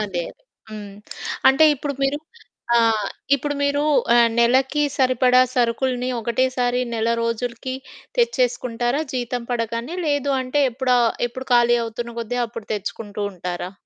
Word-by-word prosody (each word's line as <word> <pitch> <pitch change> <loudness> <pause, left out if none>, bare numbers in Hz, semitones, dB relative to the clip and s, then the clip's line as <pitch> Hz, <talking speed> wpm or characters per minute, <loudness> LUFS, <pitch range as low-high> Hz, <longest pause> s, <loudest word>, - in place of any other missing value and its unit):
అదే. 190 -5 -2
అదే. - - -35 0.3
హ్మ్. 205 -2 -8 0.5
అంటే, 270 +4 +5
ఇప్పుడు 280 +1 -4
మీరు 275 +2 0 0.6
ఆహ్, 225 -2 +3 0.3
ఇప్పుడు 290 +1 -2
మీరు 285 0 +1 0.3
ఆహ్, 235 -1 +6
నెలకి 260 +5 +3
సరిపడా 255 -1 +4
సరుకులిని 250 +1 0
ఒకటేసారి 245 +1 0
నెల 225 0 0
రోజులుకి 235 +2 -3 0.4
తెచ్చేసుకుంటారా 250 - +1
జీతం 245 -1 -3
పడగానే? 230 +6 -3
లేదు 285 -1 +1
అంటే, 260 +3 0
ఎప్పుడా 255 0 +1 0.3
ఎప్పుడు 260 +2 -8
ఖాళీ 240 0 +5
అవుతున్న 235 +1 -6
గొద్దీ 240 +2 -3
అప్పుడు 225 -2 -9
తెచ్చుకుంటూ 210 0 -5
ఉంటారా? 180 0 -5
245 Hz, 125 wpm, -22 LUFS, 230-260 Hz, 0.6 s, ఆహ్